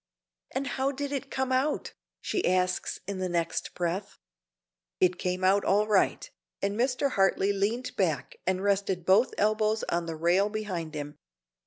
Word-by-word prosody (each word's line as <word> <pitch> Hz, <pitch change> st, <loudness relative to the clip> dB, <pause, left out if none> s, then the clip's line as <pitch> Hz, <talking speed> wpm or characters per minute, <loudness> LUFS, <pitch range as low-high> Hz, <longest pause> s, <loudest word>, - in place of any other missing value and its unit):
"And 270 Hz, +1 st, -2 dB
how 270 Hz, +1 st, 0 dB
did 285 Hz, +1 st, -4 dB
it 275 Hz, -1 st, -3 dB
come 265 Hz, -1 st, -1 dB
out?" 265 Hz, +4 st, 0 dB, 0.3 s
she 375 Hz, -, -1 dB
asks 180 Hz, 0 st, 0 dB
in 195 Hz, 0 st, -4 dB
the 185 Hz, -1 st, -1 dB
next 170 Hz, -1 st, -2 dB
breath. 180 Hz, +3 st, -3 dB, 0.8 s
"It 180 Hz, -1 st, +3 dB
came 180 Hz, 0 st, -2 dB
out 195 Hz, +2 st, +4 dB
all 205 Hz, +2 st, +3 dB
right," 210 Hz, -, +2 dB, 0.3 s
and 200 Hz, +1 st, -1 dB
Mr. 250 Hz, +3 st, +1 dB
Hartley 195 Hz, 0 st, +2 dB
leaned 220 Hz, +6 st, -1 dB
back 160 Hz, -9 st, -1 dB
and 185 Hz, 0 st, +1 dB
rested 195 Hz, -3 st, 0 dB
both 200 Hz, +7 st, +4 dB
elbows 215 Hz, +1 st, +2 dB
on 170 Hz, 0 st, -1 dB
the 165 Hz, -, -3 dB
rail 175 Hz, +5 st, +2 dB
behind 185 Hz, -7 st, -4 dB
him. 145 Hz, 0 st, -6 dB
195 Hz, 160 wpm, -28 LUFS, 180-225 Hz, 0.8 s, out